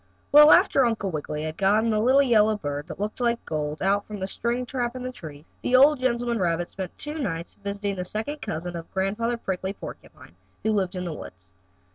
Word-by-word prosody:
Well, 300 +1 +9
after 270 - +6
Uncle 220 -5 0
Wiggily 150 -1 -4
had 155 0 -5
gotten 210 +4 +3
the 215 -1 +2
little 260 +5 +5
yellow 220 -4 +4
bird, 145 -4 -4
that - - -8
looked 210 +4 -3
like 235 -1 0
gold, 150 0 -3
out 200 +1 +2
from 210 - -6
the 190 - -3
string 235 +5 -2
trap 245 -1 -3
in 255 - -6
the 255 - -4
tree, 155 -9 -11 0.2
the 250 - +1
old 280 +2 +6
gentleman 240 -2 0
rabbit 175 -1 0
spent 190 -2 -7
two 300 +2 -5
nights 170 - -4
visiting 200 -1 -3
a - - -1
second 220 +11 -4
cousin 175 -2 -4
of 165 -1 -8
Grandfather 210 +5 0
Prickly 190 -3 -3
Porcupine, 85 - -11 0.3
who 220 - +2
lived 195 -3 0
in 180 - -3
the 170 - -3
woods. 90 -9 -11
205 Hz, 210 wpm, -25 LUFS, 175-240 Hz, 0.3 s, Well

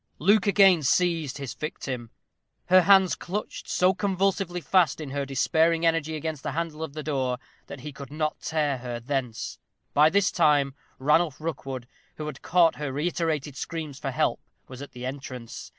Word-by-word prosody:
Luke 205 +7 +3
again 195 -4 +6
seized 165 -1 +1
his 140 -3 -5
victim. 130 -6 -5 0.6
Her 185 +1 +8
hands 190 -1 +5
clutched 200 +4 -5
so 185 +1 +3
convulsively 190 -2 0
fast 175 -4 +2
in 150 -4 -6
her 140 0 -2
despairing 160 +5 +2
energy 165 -1 +1
against 155 -1 -4
the - - -4
handle 165 -1 -3
of 160 -3 -5
the 155 0 -5
door 130 -4 -1 0.3
that 135 - -9
he 150 - -6
could 140 0 -9
not 155 0 -2
tear 150 -4 0
her 120 -1 -5
thence. 125 -2 -3 0.3
By 150 +2 +6
this 200 +2 +2
time 140 -2 +3 0.2
Ranulph 150 +2 +2
Rookwood, 135 -6 -5 0.3
who 155 - -6
had 150 -3 -7
caught 170 -2 +3
her 150 -2 -3
reiterated 150 -1 -1
screams 155 -3 -5
for 140 - -3
help, 130 - 0 0.3
was 130 0 -10
at 145 - -9
the 125 0 -7
entrance. 130 -3 -7
150 Hz, 170 wpm, -26 LUFS, 135-170 Hz, 0.6 s, Her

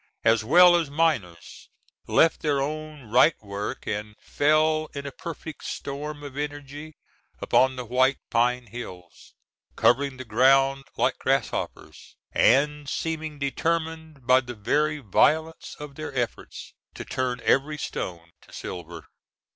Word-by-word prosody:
as 115 -1 +3
well 175 +8 +7
as 165 -4 0
miners—left 145 - -1
their 145 -3 +1
own 155 0 -4
right 130 +6 +5
work 100 0 -5
and 105 0 -4
fell 155 +1 +2
in 140 0 -5
a 140 - -5
perfect 160 0 -8
storm 145 +1 -6
of 140 -2 -8
energy 145 +1 -6 0.4
upon 130 0 +3
the 125 -1 -6
White 130 +3 +2
Pine 120 +1 +2
Hills, 95 -6 -10 0.4
covering 135 +2 +2
the 130 - -8
ground 135 +4 +3
like - - +1
grasshoppers, - - -3 0.2
and 145 +2 +3
seeming 160 -2 -3
determined 160 0 -2
by 130 +1 +5
the 120 -1 -8
very 150 +8 0
violence 160 - +1
of 150 -1 -8
their 155 +2 -6
efforts 120 -2 -4 0.2
to - - -7
turn 130 -1 -2
every 150 +3 +2
stone 85 - -5
to - - -20
silver. 85 -2 -8
140 Hz, 130 wpm, -25 LUFS, 120-155 Hz, 0.4 s, well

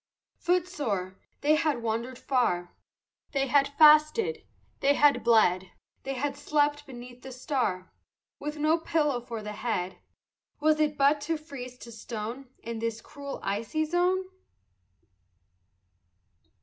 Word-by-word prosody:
Footsore, 285 - -1 0.2
they 295 +2 +4
had 305 -6 +1
wandered 230 +3 -2
far, 205 -12 0 0.6
They 275 -1 +1
had 275 +1 +3
fasted, 305 +9 +5 0.4
they 285 +1 +3
had 280 -6 +4
bled; 190 -6 +4 0.3
They 270 0 -4
had 280 +2 -2
slept 290 0 0
beneath 245 -1 -10
the 265 - -9
star 250 -8 -2 0.5
With 300 +1 -5
no 310 +2 +2
pillow 295 -6 0
for 230 -3 -6
the 210 - -5
head; 205 -4 -3 0.6
Was 305 +1 +3
it 300 -1 +1
but 285 +1 +4
to 320 +2 -1
freeze 260 -5 -9
to 235 - -11
stone 230 +3 -6
In 230 -1 -5
this 230 0 -2
cruel 280 +3 -8
icy 225 +10 -1
zone? 355 +3 +1
275 Hz, 125 wpm, -28 LUFS, 230-300 Hz, 0.6 s, fasted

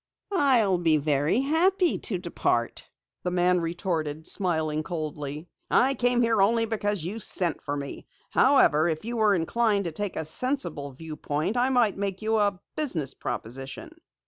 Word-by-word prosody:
"I'll 240 - +3
be 165 -3 +3
very 150 - +1
happy 345 +6 +2
to - - -1
depart," - - -2 0.3
the 180 - -2
man 180 0 +2
retorted, 165 -3 -3
smiling 160 -6 0
coldly. 155 -2 -5 0.2
"I 265 +2 +4
came 245 -2 +2
here 225 -3 +2
only 225 +3 +3
because 205 -5 -2
you 195 +7 -4
sent 180 -5 0
for 145 0 -3
me. 140 -1 -7 0.2
However, 155 +4 +4
if 160 +4 -3
you 235 +1 -3
were 215 -2 +4
inclined 205 +4 +1
to 170 - -2
take 205 +4 -4
a 160 - -3
sensible 175 - -1
viewpoint, 155 - -4
I 250 +1 +2
might 240 -6 +2
make 195 0 -3
you 220 0 +1
a 200 -3 +1 0.2
business 170 - -1
proposition." 130 +4 -6
180 Hz, 155 wpm, -26 LUFS, 155-225 Hz, 0.3 s, I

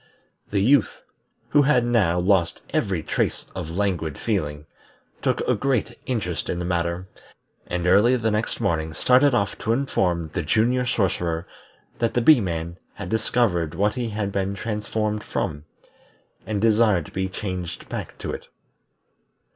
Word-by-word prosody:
The 100 -1 +1
Youth, 135 +1 +3 0.5
who 145 - +5
had 135 -4 +3
now 105 -8 +2
lost 90 -2 +1
every 95 -6 0
trace - - -1
of 80 - -5
languid 85 -5 -1
feeling, 75 -9 -2 0.6
took - - +1
a - - +2
great 125 -4 0
interest 105 -9 -2
in - - -1
the 90 - -3
matter, 85 +1 -1 0.6
and 90 0 -2
early 105 +7 +5
the 110 -2 0
next 105 +2 -1
morning 80 -1 -1
started 130 +1 +4
off 100 -3 0
to 115 - +1
inform 90 - 0
the 90 - -1
Junior 120 +9 +2
Sorcerer 90 -6 0 0.5
that 115 -1 0
the 120 - +3
Bee 140 0 +7
man 85 -2 -3 0.2
had 95 -3 -6
discovered 95 -8 +1
what 105 +4 +2
he 120 -3 -2
had 105 -2 -2
been 100 0 -1
transformed 105 0 -2
from, 75 -5 -3 0.8
and 105 -2 -1
desired 105 -5 +3
to - - -12
be 95 0 -2
changed 90 -3 -5
back - - -6
to - - -4
it. - - -7
100 Hz, 155 wpm, -24 LUFS, 85-115 Hz, 0.8 s, Bee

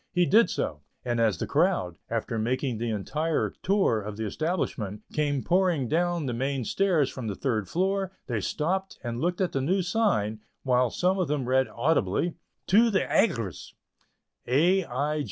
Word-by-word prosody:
He 180 -1 +3
did 225 +6 +5
so, 75 -1 -3 0.2
and 120 -1 0
as 110 -6 +2
the - - -2
crowd, 90 -1 +1
after 115 0 -2
making 125 +1 -1
the 120 0 -2
entire 150 +10 -1
tour 190 - +2
of 105 0 -7
the 110 - -3
establishment, 110 - -2
came 145 -3 0
pouring 175 -7 +2
down 170 +2 0
the 125 - -2
main 135 +1 -2
stairs 180 - +2
from 130 -4 -6
the 100 - -3
third 110 -7 -1
story, 190 +2 0 0.2
they 115 -4 -2
stopped 185 - -2
and 120 -1 -4
looked 175 +3 0
at 185 - +1
the 135 - -1
new 185 +7 +1
sign, 175 - +1 0.2
while 125 -2 +3
some 185 - +1
of 180 - +1
them 140 -3 -1
read 130 +1 +3
audibly: 160 - 0 0.3
"To 225 +5 +5
the 195 -3 +2
Aigress." 115 - 0
135 Hz, 165 wpm, -27 LUFS, 115-180 Hz, 0.3 s, did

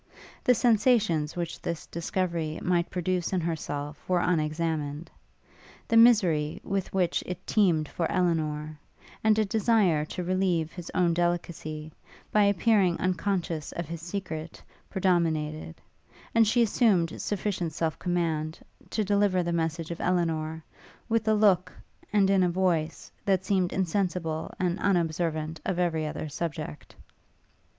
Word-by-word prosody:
The 250 - +5
sensations 215 - +2
which 170 -1 -4
this 170 -2 -4
discovery 170 -2 -2
might 175 -1 +1
produce 180 0 -1
in 185 - +2
herself 150 -3 -4
were 180 -1 +3
unexamined: 155 -2 -1 0.8
the - - +1
misery 185 -10 +5
with 195 -1 -2
which 180 -3 +1
it 180 0 -6
teemed 170 -8 +2
for 165 +2 -2
Elinor, 155 -4 -1 0.4
and 220 -1 +4
a 215 - +3
desire 205 -6 +2
to 180 - -5
relieve 180 -3 0
his 175 -2 -8
own 175 -2 +3
delicacy, 165 -3 -2 0.4
by 210 -1 +4
appearing 200 -2 +3
unconscious 180 -3 -1
of 170 - -4
his 165 0 -6
secret, 170 -3 -5 0.3
predominated: 160 - 0 0.6
and 230 -1 +5
she 235 +3 +4
assumed 200 -7 +2
sufficient 195 -5 -2
self 160 0 -2
command, 165 -3 -1 0.3
to 215 - 0
deliver 200 -2 +2
the 170 0 -2
message 165 0 -2
of 170 - -5
Elinor, 160 -3 0 0.5
with 225 -1 +1
a 215 - +4
look, 190 -4 +3 0.4
and 200 -2 +3
in 195 -1 +4
a 180 - +3
voice, 170 -3 -1
that 190 -2 +1
seemed 185 -3 +1
insensible 175 -3 -1
and 180 0 0
unobservant 160 -4 0
of 190 - -2
every 165 -3 0
other 155 - -4
subject. 150 - -5
175 Hz, 135 wpm, -28 LUFS, 160-190 Hz, 0.8 s, The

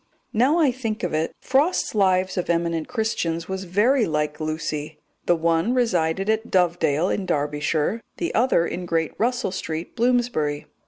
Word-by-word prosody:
Now 260 +9 +3
I 305 -6 +4
think 225 -4 -4
of 180 - -1
it, 155 +1 0
Frost's 285 +7 +1
Lives 190 -2 +2
of 180 - -2
Eminent 170 -1 0
Christians 180 -9 -2
was 190 0 -4
very 220 +8 +2
like 150 -1 -1
Lucy. 155 -1 -3 0.3
The 175 - +5
one 165 +7 +1
resided 190 -6 +1
at 220 +1 0
Dovedale 175 -3 +2
in 195 -2 -2
Derbyshire, 150 +7 0 0.2
the 340 - -2
other 230 -8 +3
in 180 0 -4
Great 165 -2 0
Russell 240 -3 0
Street, 165 -3 -5
Bloomsbury. 235 -12 +1
180 Hz, 155 wpm, -23 LUFS, 160-230 Hz, 0.3 s, The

